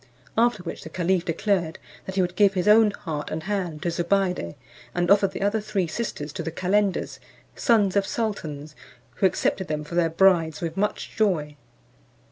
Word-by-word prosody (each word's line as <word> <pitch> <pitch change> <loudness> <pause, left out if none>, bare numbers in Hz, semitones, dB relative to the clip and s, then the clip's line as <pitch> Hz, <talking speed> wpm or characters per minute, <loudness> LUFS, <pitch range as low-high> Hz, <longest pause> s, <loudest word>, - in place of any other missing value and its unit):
After 230 -4 +2
which 170 - -6
the - - -9
caliph 180 +1 0
declared 170 -1 0 0.3
that 190 - -5
he 195 - +3
would 180 0 -1
give 200 0 +4
his 185 +1 0
own 215 +1 +7
heart 155 -7 -5
and 160 0 -4
hand 180 -5 -3
to 170 - 0
Zobeide, 175 - 0 0.4
and 175 +1 +1
offered 200 -1 +5
the - - -5
other 205 +2 +1
three 205 -3 -1
sisters 155 -6 -4
to - - -4
the 165 - -3
calenders, 190 +4 0 0.4
sons 205 -5 +2
of 200 -1 +2
sultans, 155 -10 -4 0.4
who 190 - +5
accepted 190 0 -1
them 150 0 -2
for 150 - -10
their 170 -1 +2
brides 165 -2 +3
with 165 -1 -4
much 205 +2 -2
joy. 165 -9 0
185 Hz, 180 wpm, -25 LUFS, 165-200 Hz, 0.4 s, own